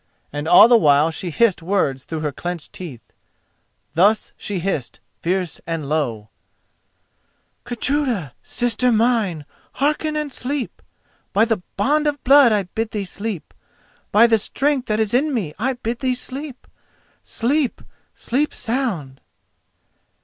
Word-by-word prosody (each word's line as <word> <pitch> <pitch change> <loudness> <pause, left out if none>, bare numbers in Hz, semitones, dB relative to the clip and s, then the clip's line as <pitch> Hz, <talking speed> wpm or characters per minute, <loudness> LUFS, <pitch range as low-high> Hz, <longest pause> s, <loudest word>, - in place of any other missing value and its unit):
And 145 +1 -4
all 175 +6 +9
the 235 -1 +6
while 150 -1 +4
she 180 +2 -5
hissed 200 +2 +2
words 160 -8 0
through 160 -2 -5
her 150 -1 -1
clenched 175 +3 -6
teeth. 155 -11 -9 0.8
Thus 205 +6 +3
she 205 - -4
hissed, 170 -8 -3 0.2
fierce 180 -2 -2
and 165 -4 -3
low: 120 -9 -2 1.4
"Gudruda, 240 - -1
Sister 245 +1 0
mine, 220 -9 +1 0.3
hearken 300 +2 0
and 300 -3 -2
sleep! 270 0 -3 0.5
By 210 +3 +4
the 225 -5 -1 0.2
bond 300 +8 +2
of 290 -1 -2
blood 275 -2 +7
I 210 -2 +2
bid 220 +5 -4
thee 210 -2 -3
sleep!— 200 -2 -5 0.6
By 215 +3 +7
the 225 -2 +4
strength 275 +4 0
that 215 0 0
is 220 0 +1
in 280 +3 +2
me 175 -10 -2
I 260 +4 +1
bid 240 -1 -4
thee 260 -2 0
sleep!— 265 +2 -6 0.6
Sleep! 270 +3 0 0.3
sleep 285 +5 -1
sound! 220 - -2
220 Hz, 135 wpm, -21 LUFS, 170-255 Hz, 1.4 s, all